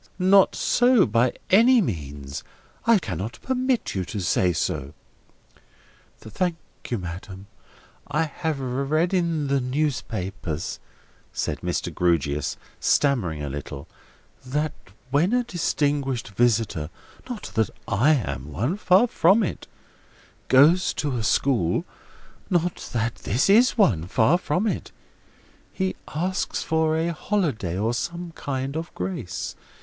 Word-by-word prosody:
Not 190 +1 +5
so, 245 -4 +4
by 115 +3 +2 0.2
any 235 +6 +7
means. 70 - -4 0.4
I 230 -1 +7
cannot 100 - -4
permit 255 -1 0
you 95 - -1
to 105 - -5
say 90 0 +2
so." 70 -3 -2 1.2
"Thank 170 - -2 0.3
you, 120 - 0
madam. 95 +1 -7 0.6
I 150 +3 +1
have 160 -1 -3
read 140 +7 0
in 170 -5 +1
the 140 -1 +1
newspapers," 110 - -3 0.5
said - - -2
Mr. - - -2
Grewgious, 75 -5 0 0.2
stammering 95 - +1
a 70 - -3
little, 70 0 -7 0.6
"that 150 +4 -1 0.4
when 165 - +3
a 250 0 +3
distinguished 145 - -1
visitor 105 -7 +1 0.4
(not 240 -4 -6
that 110 -2 +1 0.2
I 130 +11 +4
am 70 - -4
one: 120 - -1
far 195 +2 +5
from 215 -1 +4
it) - - -4 0.8
goes 155 +8 +5
to 145 -3 -1
a 120 - -1
school 110 -6 +1 0.6
(not 175 -1 -1
that 115 0 -1
this 125 - +1
is 240 +5 +5
one: 95 - +3
far 125 - +3
from 180 +5 0
it), 215 - -2 0.8
he 190 -1 -2
asks 185 +5 -2
for 160 -1 +1
a 165 +1 0
holiday, 145 - -1
or 110 +4 0
some 170 +5 -4
sort 135 0 -3
of 165 +1 -4
grace. 90 -1 -4
135 Hz, 125 wpm, -24 LUFS, -, 1.2 s, any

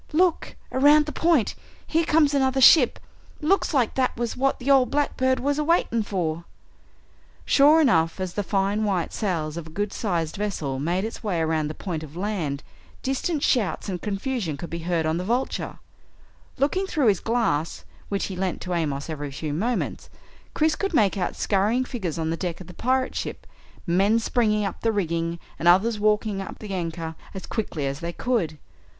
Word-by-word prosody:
"Look! 345 +1 +2 0.2
Around 290 +3 +5
the 300 - -4
point! 320 -10 +2 0.3
Here 330 +1 +1
comes 300 -2 +4
another 265 -1 +2
ship 265 0 +7 0.4
looks 355 +6 +2
like 260 -7 +2
that 260 -1 0
was 235 -1 -2
what 270 +1 +1
the 265 +2 0
ol' 265 -2 +5
blackbird 260 -2 +1
was 285 +2 0
a - - +1
waiting 300 -8 +2
for!" 170 -5 -2 1.0
Sure 295 +3 +6
enough, 165 - +3
as 185 -2 -3
the 205 - -1
fine 200 +2 0
white 190 -5 -1
sails 165 -7 -2
of 165 -2 -6
a - - -10
good 205 +5 -3
sized 170 -6 -2
vessel 160 -10 -2
made 175 +7 0
its 225 - -7
way 190 -6 -1
around 160 -1 0
the 155 - -6
point 170 -6 -4
of 155 +1 -10
land, 180 -8 -2 0.4
distant 280 +3 -1
shouts 205 - +1
and 180 -2 -4
confusion 205 - -2
could 170 - -7
be 170 - -3
heard 165 -2 +1
on 160 +1 0
the 180 - -2
Vulture. 240 +7 -2 0.8
Looking 370 +8 +1
through 305 -7 0
his 195 - +2
glass, 220 -10 -1 0.2
which 200 -1 -1
he 190 - -5
lent 185 0 -2
to 180 - -3
Amos 145 -5 -1
every 145 -3 -5
few 145 +2 -4
moments, 225 +10 -2 0.5
Chris 310 0 +2
could 395 -1 -2
make 205 -7 +3
out 185 -3 -2
scurrying 215 +6 +1
figures 190 - -4
on 160 -1 -1
the - - 0
deck 175 -2 -3
of 185 - -9
the 180 - -11
pirate 255 +6 0
ship, - - -5 0.4
men 195 +5 +3
springing 220 -2 +1
up 195 - -5
the 225 - +2
rigging 170 -4 -1 0.2
and 170 - 0
others 210 +5 +4
walking 210 -1 +1
up 195 - -7
the 210 -2 -7
anchor 165 -2 -3 0.2
as 190 - -6
quickly 185 -10 -3
as 135 +1 -3
they 170 0 -4
could. 175 -8 -1
200 Hz, 190 wpm, -24 LUFS, 170-255 Hz, 1.0 s, ship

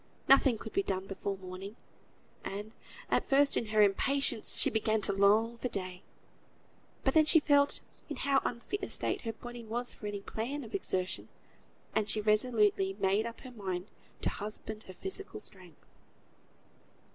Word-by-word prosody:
Nothing 270 -3 +6
could 220 - -9
be - - +2
done 190 -1 -2
before 195 0 -4
morning: 190 +2 -8 0.7
and, 205 +2 -5 0.4
at - - +1
first 280 0 +5
in 230 - 0
her 215 0 +4
impatience, 235 +3 +3
she - - +5
began 220 0 +1
to 200 - +4
long 215 +4 +3
for 250 - -1
day; 185 -5 -4 1.0
but 270 - +2
then 315 -1 +6
she 320 +2 +6
felt 285 -1 +3 0.3
in - - -3
how 275 -1 +2
unfit 245 - -3
a - - -3
state - - 0
her 225 -1 -4
body 240 +1 -9
was 240 +2 -3
for 210 - -8
any 205 -1 -4
plan 255 +8 -4
of 225 - -11
exertion, 185 - -2 0.6
and 210 -1 0
she 215 - +3
resolutely 210 -2 +2
made 200 +3 +2
up 230 - -9
her 255 - -10
mind 190 -4 -5 0.3
to - - +1
husband 215 +1 -6
her 185 - -10
physical 390 +2 -4
strength. 185 - -14
220 Hz, 165 wpm, -31 LUFS, 195-250 Hz, 1.0 s, Nothing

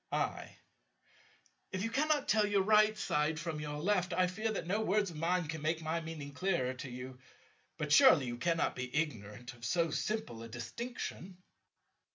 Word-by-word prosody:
I. - - -2 1.1
If 185 0 -2
you 225 - -2
cannot 295 +1 +1
tell 215 -5 +4
your 200 -2 +2
right 215 +1 +5
side 150 -1 0
from 165 -2 -3
your 150 -1 -4
left, 180 +1 +1
I 185 - +3
fear 215 +5 -2
that - - -3
no 200 +5 0
words 205 -2 +1
of 160 - -9
mine 175 +1 +1
can 160 0 -5
make 160 +1 -1
my 160 +2 -1
meaning 155 -3 -7
clearer 140 -6 0
to 130 +1 -7
you. 125 +1 -8 0.6
But 150 -2 -3
surely 260 - +7
you 120 -1 -4
cannot 165 +4 +1
be 125 0 -5
ignorant 120 -5 -3
of 120 -1 -18
so 165 +7 +1
simple 210 - -2
a 115 - -8
distinction. 180 - -6
165 Hz, 180 wpm, -33 LUFS, 140-205 Hz, 1.1 s, surely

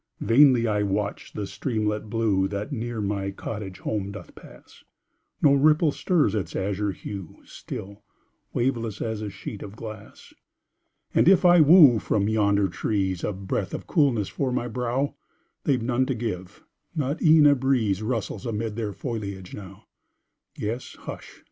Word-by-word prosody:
Vainly 125 -1 +5
I 105 -1 +1
watch 100 +1 -2
the 105 - -4
streamlet 105 0 -2
blue 105 -4 +1
That 100 +6 -5
near 120 -3 -3
my 100 -1 -2
cottage 100 -1 -6
home 100 -2 -2
doth 100 -4 -10
pass, - - -16 0.6
No 140 - +6
ripple 150 +2 +4
stirs 155 - +1
its 105 -4 -3
azure 100 +1 -1
hue, 95 -2 -7
Still 100 +1 -8 0.5
waveless, 115 -4 -1
as 110 -1 -3
a 105 - -4
sheet 100 +1 -8
of 100 +1 -8
glass 110 -2 -10 0.8
And - - +5
if 190 -1 +5
I 175 -1 +7
woo 150 -6 +8
from 100 -1 0
yonder 100 -2 +2
trees 95 0 -2
A - - 0
breath 95 -1 -3
of - - -7
coolness 125 - +2
for 135 -2 -2
my 120 -1 -1
brow, 125 +3 -1 0.5
They've 130 -5 +1
none 125 +2 +1
to 130 - -1
give 100 -5 -5 0.3
not 145 0 -2
e'en 155 -1 +6
a 145 - +7
breeze 125 -7 +1
Rustles 110 -2 -3
amid 110 -1 -3
their 110 -3 -3
foliage 100 -6 -5
now; 95 +1 -10 0.7
Yes, 115 +4 -4
hush! - - -9
110 Hz, 155 wpm, -25 LUFS, 100-130 Hz, 0.8 s, woo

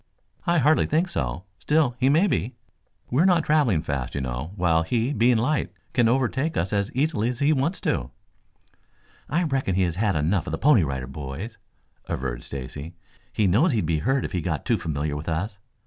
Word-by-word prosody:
"I 170 0 +3
hardly 155 +1 +4
think 165 +4 +1
so. 65 - -3 0.2
Still, 150 -5 +2
he 130 +1 +3
may 160 +7 +4
be. 130 - -1 0.6
We 130 +6 +3
are - - +4
not 175 -3 +4
traveling 135 - +2
fast, 70 -5 -3
you 70 - -1
know, 65 +5 -4
while 85 -4 +2
he, 115 - 0
being 120 +1 +3
light, 140 +7 0 0.2
can 120 -3 +3
overtake 130 +5 0
us 95 +4 -1 0.2
easily 135 -5 +1
if 125 - -3
he 145 +4 +3
wants 150 +6 0
to." - - -1 1.2
"I 170 +6 +1
reckon 135 - 0
he 95 - +3
has 85 -1 -1
had 105 -2 +1
enough 80 +3 0
of - - -3
the - - 0
Pony 135 - +5
Rider 65 -3 -3
Boys," 70 - -7 0.5
averred - - -3
Stacy. 70 +5 -7 0.4
"He 110 - +1
knows 120 - +3
he'd 110 -7 0
be 80 -1 0
hurt 135 - +1
if - - -5
he 90 -4 -1
got 75 -3 -3
too - - +1
familiar 75 -1 -2
with 75 +3 -5
us. 95 +6 -3
105 Hz, 195 wpm, -25 LUFS, -, 1.2 s, Pony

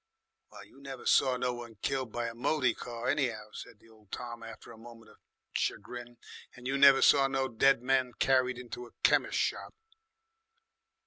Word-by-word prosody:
"Well, - - -12
you 135 - -19
never 135 -2 -9
saw 130 -2 +3
no 125 0 -1
one 120 -2 -9
killed 130 -4 -2
by 120 +1 -3
a 115 - -6
moty 130 +1 +1
car, 120 -1 -7
any'ow," 115 -7 -1
said 105 - -10
old 110 -3 -22
Tom 120 -1 -6
after 115 0 -11
a 115 - -13
moment 115 -1 -14
of - - -21 0.4
chagrin. 120 +3 -4 0.4
"And 125 - -14
you 135 - -1
never 140 -1 +7
saw 135 -2 +6
no 135 -1 -1
dead 130 +1 +3
men 130 -1 +1
carried 130 -2 +2
into 125 0 -8
a - - -21
chemis' - - +3
shop." - - -2
125 Hz, 175 wpm, -30 LUFS, 115-135 Hz, 0.4 s, never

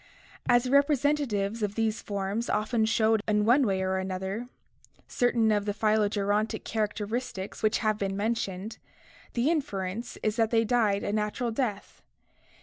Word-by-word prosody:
As 240 -1 +5
the 255 - -3
representa 285 +1 +3
tives 205 +1 -2
of 205 -1 -1
these 225 -1 0
forms 200 +3 -3
often 220 +1 +1
showed 220 0 +2
in 210 -1 +2
one 250 +3 +4
way 190 -1 0
or 190 0 0
another 190 +5 -4 0.6
certain 235 -3 +2
of 205 -1 +1
the 205 -1 -2
phylogerontic 210 0 +1
characteristics 215 -1 -3
which 215 0 +2
have 215 -1 +1
been 195 -1 -2
mentioned, 210 -1 -2 0.5
the 250 +6 +2
inference 225 - -3
is 215 +1 0
that 225 -1 +3
they 225 -1 +3
died 215 -4 +2
a 205 - -2
natural 215 +3 -1
death. 220 -4 -3
215 Hz, 150 wpm, -28 LUFS, 205-235 Hz, 0.6 s, As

